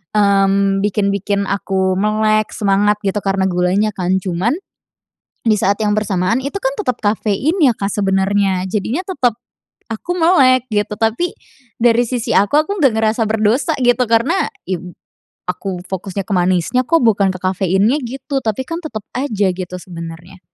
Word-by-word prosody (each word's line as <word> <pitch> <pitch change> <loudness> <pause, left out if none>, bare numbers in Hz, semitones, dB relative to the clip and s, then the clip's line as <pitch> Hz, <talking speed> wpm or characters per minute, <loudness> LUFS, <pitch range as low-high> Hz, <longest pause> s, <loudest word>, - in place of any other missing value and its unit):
mmm, 195 -1 +3
bikin 205 -1 +1
bikin 200 0 -1
aku 190 -1 0
melek 215 0 +1
semangat 205 0 +2
gitu 195 +2 0
karena 195 -1 0
gulanya 185 +4 +1
kan. 185 0 0
Cuman 190 - 0 0.9
di 220 -2 +2
saat 200 +1 +1
yang 210 -1 +1
bersamaan 195 +1 0
itu 275 +5 -5
kan - - +1
tetap 250 - -1
kafein 215 - 0
ya 270 -9 +4
Kak 200 -1 -3
sebenarnya. 195 -1 +1
Jadinya 225 - -1
tetap 280 - 0 0.6
aku 225 +11 -3
melek 260 -7 +4
gitu, 210 0 -1
tapi 225 +11 0 0.5
dari 240 0 +4
sisi 240 -1 -3
aku, 205 +7 +2
aku 400 0 -3
enggak 265 -5 +4
ngerasa 220 +1 +1
berdosa 225 +8 +1
gitu 245 +1 +3
karena, 270 +12 +2 0.2
iya 185 -1 -2
b 180 - -9 0.6
aku 180 0 -4
fokusnya 190 +1 -4
ke 200 - -10
manisnya 185 +8 +1
kok 330 -3 +3
bukan 205 -4 +3
ke 185 - -8
kafeinnya 190 - +1
gitu, 270 +3 -3
tapi 220 +3 -1
kan 330 +4 -4
tetap 220 -10 -6
aja 220 -7 0
gitu 180 0 -6
sebenarnya. 170 +1 -9
210 Hz, 160 wpm, -17 LUFS, 190-240 Hz, 0.9 s, ya